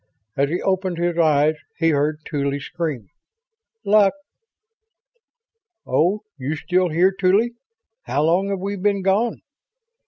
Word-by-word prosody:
As 140 Hz, +1 st, +1 dB
he 175 Hz, +3 st, -1 dB
opened 190 Hz, -2 st, 0 dB
his 175 Hz, 0 st, 0 dB
eyes 155 Hz, -1 st, +3 dB, 0.2 s
he 165 Hz, -1 st, +2 dB
heard 150 Hz, +1 st, 0 dB
Tuly 140 Hz, -2 st, -2 dB
scream: 150 Hz, -, -5 dB, 0.4 s
"... 450 Hz, 0 st, -52 dB
Luck!" 205 Hz, +1 st, +4 dB, 1.7 s
"Oh 190 Hz, +6 st, +1 dB, 0.2 s
you 135 Hz, +4 st, -2 dB
still 180 Hz, +3 st, 0 dB
here, 175 Hz, +4 st, +3 dB
Tuly? 200 Hz, +5 st, +2 dB, 0.5 s
How 145 Hz, -, 0 dB
long 180 Hz, +5 st, +2 dB
have 200 Hz, -, -1 dB
we 200 Hz, +1 st, -3 dB
been 200 Hz, 0 st, 0 dB
gone?" 205 Hz, +5 st, +1 dB
180 Hz, 130 wpm, -21 LUFS, 155-195 Hz, 1.7 s, Luck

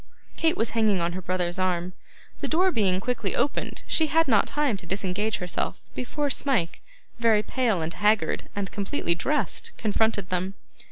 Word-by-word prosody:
Kate 325 Hz, +2 st, +2 dB
was 225 Hz, -, 0 dB
hanging 215 Hz, -4 st, +2 dB
on 170 Hz, 0 st, 0 dB
her 185 Hz, +2 st, -5 dB
brother's 180 Hz, 0 st, -1 dB
arm. 180 Hz, -1 st, 0 dB, 0.5 s
The -, -, -2 dB
door 365 Hz, +4 st, +3 dB
being 190 Hz, -, +2 dB
quickly 225 Hz, -2 st, -2 dB
opened, 285 Hz, -, -1 dB
she 315 Hz, -, +1 dB
had 325 Hz, +1 st, +3 dB
not 215 Hz, -6 st, +4 dB
time 290 Hz, -6 st, +1 dB
to 185 Hz, -, -11 dB
disengage 195 Hz, +3 st, -1 dB
herself, 180 Hz, -1 st, -2 dB
before 285 Hz, +3 st, -2 dB
Smike, 245 Hz, -12 st, 0 dB, 0.4 s
very 225 Hz, -3 st, +4 dB
pale 225 Hz, -11 st, +1 dB
and 160 Hz, +1 st, -3 dB
haggard, 210 Hz, +1 st, +1 dB
and 200 Hz, -2 st, -3 dB
completely 200 Hz, -2 st, -1 dB
dressed, 255 Hz, -, -1 dB
confronted 215 Hz, -2 st, +1 dB
them. 185 Hz, +2 st, -1 dB
210 Hz, 165 wpm, -26 LUFS, 185-250 Hz, 0.5 s, not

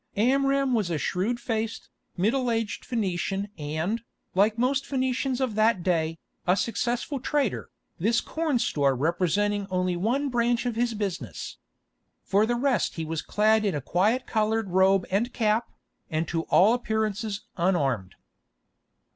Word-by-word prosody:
Amram 275 Hz, +3 st, +2 dB
was 215 Hz, -6 st, +1 dB
a 165 Hz, -, 0 dB
shrewd 195 Hz, -, -1 dB
faced, 225 Hz, -2 st, -3 dB, 0.3 s
middle 240 Hz, +7 st, +1 dB
aged 225 Hz, -3 st, -2 dB
Phœnician 195 Hz, -2 st, -1 dB
and, 160 Hz, +9 st, -2 dB, 0.3 s
like 210 Hz, +4 st, +3 dB
most 265 Hz, +3 st, +1 dB
Phœnicians 260 Hz, -1 st, -1 dB
of 260 Hz, -4 st, 0 dB
that 215 Hz, -3 st, +2 dB
day, 165 Hz, -3 st, 0 dB, 0.3 s
a 180 Hz, -, +5 dB
successful 240 Hz, +5 st, -1 dB
trader, 275 Hz, -3 st, -1 dB, 0.3 s
this 225 Hz, +7 st, +2 dB
corn 315 Hz, -4 st, -1 dB
store 140 Hz, -, +1 dB
representing 190 Hz, +7 st, 0 dB
only 185 Hz, -1 st, 0 dB
one 245 Hz, +10 st, 0 dB
branch 240 Hz, 0 st, +1 dB
of 240 Hz, -2 st, -1 dB
his 235 Hz, 0 st, 0 dB
business. 175 Hz, -, -4 dB, 0.7 s
For 205 Hz, +3 st, +2 dB
the 240 Hz, -, +1 dB
rest 245 Hz, -3 st, +1 dB
he 160 Hz, -, -3 dB
was 160 Hz, 0 st, -3 dB
clad 215 Hz, +1 st, +2 dB
in 200 Hz, -6 st, 0 dB
a -, -, -1 dB
quiet 205 Hz, -, +1 dB
coloured 220 Hz, -2 st, 0 dB
robe 190 Hz, 0 st, +4 dB
and 225 Hz, +6 st, +1 dB
cap, 220 Hz, 0 st, +1 dB, 0.4 s
and 160 Hz, -1 st, -1 dB
to 165 Hz, -1 st, -1 dB
all 205 Hz, +6 st, +6 dB
appearance 220 Hz, -3 st, -1 dB
unarmed. 140 Hz, -, 0 dB
215 Hz, 145 wpm, -26 LUFS, 180-240 Hz, 0.7 s, all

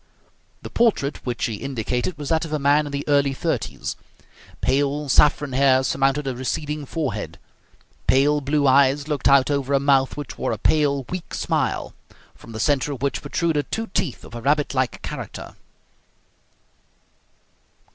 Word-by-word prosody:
The -, -, -8 dB
portrait 210 Hz, -12 st, +1 dB
which 120 Hz, +2 st, -1 dB
he 110 Hz, -4 st, -3 dB
indicated 125 Hz, -, -3 dB
was 145 Hz, -2 st, -5 dB
that 160 Hz, 0 st, +2 dB
of 160 Hz, -, -6 dB
a 155 Hz, -, +1 dB
man 145 Hz, +1 st, +3 dB
in -, -, -7 dB
the 140 Hz, 0 st, -4 dB
early 140 Hz, -1 st, +3 dB
thirties. -, -, -3 dB, 0.6 s
Pale 145 Hz, +1 st, 0 dB
saffron 145 Hz, 0 st, +3 dB
hair 130 Hz, 0 st, +4 dB
surmounted 135 Hz, +2 st, +1 dB
a 130 Hz, -2 st, -2 dB
receding 150 Hz, +3 st, -3 dB
forehead. 110 Hz, -, -3 dB, 0.7 s
Pale 145 Hz, +2 st, +3 dB
blue 145 Hz, +1 st, +1 dB
eyes 140 Hz, +2 st, +4 dB
looked 150 Hz, -2 st, 0 dB
out 140 Hz, 0 st, +5 dB
over 140 Hz, -1 st, 0 dB
a -, -, +4 dB
mouth 135 Hz, -1 st, +2 dB
which 145 Hz, -5 st, -7 dB
wore -, -, -1 dB
a -, -, -3 dB
pale, 140 Hz, +3 st, +2 dB
weak 180 Hz, -1 st, -5 dB
smile, -, -, -1 dB, 0.4 s
from 115 Hz, -, -14 dB
the 110 Hz, -, -6 dB
centre 145 Hz, +4 st, +1 dB
of 135 Hz, -1 st, -8 dB
which 140 Hz, -2 st, -1 dB
protruded 160 Hz, -4 st, -1 dB
two 225 Hz, -3 st, -3 dB
teeth 140 Hz, -9 st, -2 dB
of -, -, -13 dB
a 120 Hz, -, -6 dB
rabbit 145 Hz, +3 st, +1 dB
like 130 Hz, -2 st, -1 dB
character. -, -, -7 dB
140 Hz, 160 wpm, -22 LUFS, 130-150 Hz, 0.7 s, out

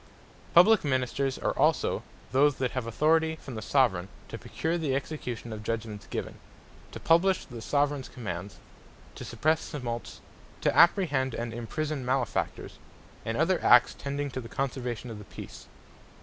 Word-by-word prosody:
For 170 Hz, -, +12 dB
Execution -, -, +6 dB
Publique 220 Hz, -, +1 dB
Ministers 130 Hz, +1 st, 0 dB
are -, -, 0 dB
also -, -, +2 dB
all -, -, -11 dB, 0.3 s
those, 145 Hz, +2 st, +4 dB
that 130 Hz, -2 st, -1 dB
have 125 Hz, -3 st, -3 dB
Authority 160 Hz, +6 st, +2 dB
from 140 Hz, -4 st, -10 dB
the 110 Hz, -, -5 dB
Soveraign, 105 Hz, -8 st, +2 dB, 0.2 s
to -, -, -6 dB
procure 165 Hz, +2 st, -2 dB
the 155 Hz, -6 st, 0 dB
Execution 125 Hz, -5 st, -4 dB
of 105 Hz, -, -6 dB
Judgements 110 Hz, -1 st, -4 dB
given; -, -, -5 dB, 0.5 s
to -, -, -7 dB
publish 180 Hz, +3 st, +3 dB
the 120 Hz, -4 st, -9 dB
Soveraigns 145 Hz, +1 st, 0 dB
Commands; 100 Hz, -4 st, -6 dB, 0.6 s
to -, -, -8 dB
suppresse 155 Hz, +1 st, 0 dB
Tumults; 120 Hz, -5 st, -5 dB, 0.4 s
to -, -, +1 dB
apprehend, 145 Hz, -, +4 dB
and 115 Hz, -1 st, -4 dB
imprison 140 Hz, +5 st, -3 dB
Malefactors; 130 Hz, -1 st, -2 dB, 0.5 s
and 115 Hz, +1 st, -1 dB
other 175 Hz, +4 st, +2 dB
acts 120 Hz, 0 st, +6 dB
tending 140 Hz, 0 st, -4 dB
to 130 Hz, -, -4 dB
the 115 Hz, -, -10 dB
conservation 125 Hz, -3 st, -3 dB
of 110 Hz, -, -7 dB
the 105 Hz, -, -11 dB
Peace. -, -, -10 dB
130 Hz, 165 wpm, -28 LUFS, 115-150 Hz, 0.6 s, For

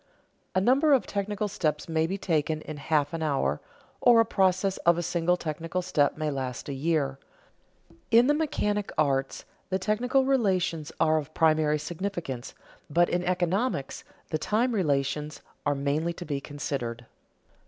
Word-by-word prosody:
A -, -, +4 dB
number 270 Hz, +9 st, +4 dB
of 265 Hz, -, +3 dB
technical 205 Hz, +1 st, -2 dB
steps 155 Hz, -6 st, -2 dB
may 160 Hz, -1 st, +1 dB
be 195 Hz, +3 st, -2 dB
taken 155 Hz, -4 st, 0 dB
in 155 Hz, -1 st, -7 dB
half 145 Hz, 0 st, 0 dB
an 165 Hz, -, -3 dB
hour, 135 Hz, -, 0 dB, 0.4 s
or 240 Hz, -2 st, +6 dB
a 225 Hz, -, +5 dB
process 190 Hz, -1 st, +1 dB
of 170 Hz, 0 st, +3 dB
a 175 Hz, -, -1 dB
single 175 Hz, +1 st, +1 dB
technical 165 Hz, +3 st, -3 dB
step 145 Hz, -6 st, +1 dB
may 155 Hz, -1 st, -1 dB
last 130 Hz, -2 st, -4 dB
a 140 Hz, -, -3 dB
year. 140 Hz, -1 st, 0 dB, 0.9 s
In 235 Hz, +2 st, +6 dB
the 290 Hz, -, +4 dB
mechanic 210 Hz, -10 st, -1 dB
arts 135 Hz, -3 st, 0 dB, 0.2 s
the 190 Hz, -, +1 dB
technical 245 Hz, +7 st, +1 dB
relations 185 Hz, -, +1 dB
are 155 Hz, -1 st, +3 dB
of 155 Hz, +1 st, -9 dB
primary 155 Hz, -1 st, +3 dB
significance, 165 Hz, -5 st, -5 dB, 0.3 s
but 175 Hz, +3 st, +3 dB
in 175 Hz, 0 st, 0 dB
economics 180 Hz, -, -1 dB, 0.3 s
the 155 Hz, -, 0 dB
time 235 Hz, +7 st, +1 dB
relations 150 Hz, -4 st, -1 dB, 0.3 s
are 145 Hz, -, +2 dB
mainly 145 Hz, +5 st, -1 dB
to 175 Hz, -, -8 dB
be 140 Hz, -2 st, -3 dB
considered. 130 Hz, -5 st, -4 dB
165 Hz, 155 wpm, -27 LUFS, 145-195 Hz, 0.9 s, or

